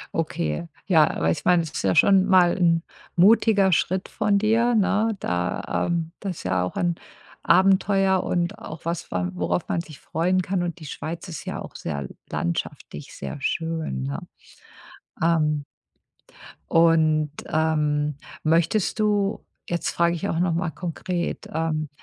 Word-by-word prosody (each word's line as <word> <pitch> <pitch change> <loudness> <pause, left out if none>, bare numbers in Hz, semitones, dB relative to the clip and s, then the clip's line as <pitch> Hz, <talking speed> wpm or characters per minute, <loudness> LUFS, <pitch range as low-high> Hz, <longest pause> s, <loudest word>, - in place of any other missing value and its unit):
Okay, 165 +2 -2 0.2
ja, 160 -5 +4
weil 80 +1 +3
ich - - -4
meine, 175 -1 +5
das 160 - -7
ist - - -4
ja 95 -1 +2
schon 195 -1 +5
mal 185 -3 +4
'n 165 -2 +3 0.3
mutiger 200 +1 +5
Schritt 185 +3 0
von 210 -2 +1
dir, 225 +3 +2
ne, 215 +2 +2
da, 90 0 -1
ähm 170 -1 -1
das 190 -4 -4
ist - - -9
ja 95 -1 0
auch 90 - -4
ein 175 -1 0 0.5
Abenteuer 190 +1 +4
und 175 +4 -1
auch 155 0 -9
was, 170 +1 -3
wa 90 -1 -1
worauf 90 0 -2
man - - 0
sich 155 -4 -13
freuen 180 +3 0
kann. 185 0 -1
Und 175 0 -4
die 155 - -10
Schweiz 165 +5 -6
ist 160 -4 -7
ja - - -4
auch - - -10
sehr 70 -3 -4 0.2
landschaftlich 80 -3 -4
sehr 70 - -6
schön, 160 - -2
ne? 70 +1 -3 1.0
Ähm 150 -3 +2 1.1
und, 160 -2 +4 0.2
ähm, 150 -2 +1 0.3
möchtest 170 +7 +1
du 205 -1 +1 0.3
jetzt 170 -1 -1
frage 170 0 +2
ich 200 +4 -3
auch 165 - -1
noch 175 -2 +1
mal 170 +1 -1
konkret, 175 0 -4
ähm, 155 -2 -1
170 Hz, 155 wpm, -24 LUFS, 155-185 Hz, 1.1 s, meine